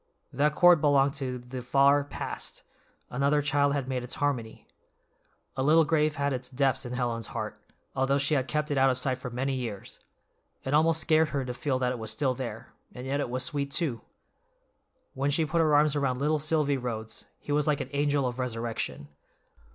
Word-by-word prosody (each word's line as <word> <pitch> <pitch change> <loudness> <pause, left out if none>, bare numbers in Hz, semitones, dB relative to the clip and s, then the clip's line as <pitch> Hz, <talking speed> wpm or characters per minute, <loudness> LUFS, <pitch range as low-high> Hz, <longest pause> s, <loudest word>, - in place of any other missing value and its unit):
That 150 +3 +1
chord 175 -3 +6
belonged 140 -2 +3
to 130 -1 -2
the 125 +1 -7
far 140 +3 +4
past—another 140 0 -4
child 145 0 +2
had 135 -3 -2
made 130 -1 -2
its 125 - -5
harmony. 125 -6 -2 0.9
A 130 - -2
little 155 +4 +5
grave 150 -1 +1
had 140 0 0
its 125 -1 -4
depths 135 0 0
in 120 - -6
Helen's 120 -2 -2
heart, - - -4 0.4
although 135 +1 +2
she 140 +2 +1
had 135 -2 +1
kept 150 0 -1
it 140 - +1
out 135 0 +5
of 130 - 0
sight 130 -1 -1
for 125 - -5
many 130 +3 -2
years; 115 -6 -5 0.6
it 135 - -3
almost 160 +1 +4
scared 160 -1 +3
her 140 -3 -2
to 125 - -4
feel 135 +1 -1
that 125 -1 0
it 125 - -4
was 110 -1 -5
still 130 +4 0
there, 120 -4 -7 0.2
and 125 - -7
yet 140 +2 -1
it 140 - -2
was 130 +1 -1
sweet, 140 -1 -2
too. 140 - -1 1.1
When 140 +2 -1
she 155 +3 +2
put 165 +2 +1
her 155 -2 +3
arms 150 0 +4
around 135 -3 0
little 150 +3 +1
Silvy 150 -2 +1
Rhodes, 110 -3 -5
he - - -8
was 150 0 +2
like 150 -2 +2
an 130 - -5
angel 145 -1 +1
of 125 0 -3
resurrection. 115 - -3
135 Hz, 200 wpm, -28 LUFS, 125-145 Hz, 1.1 s, chord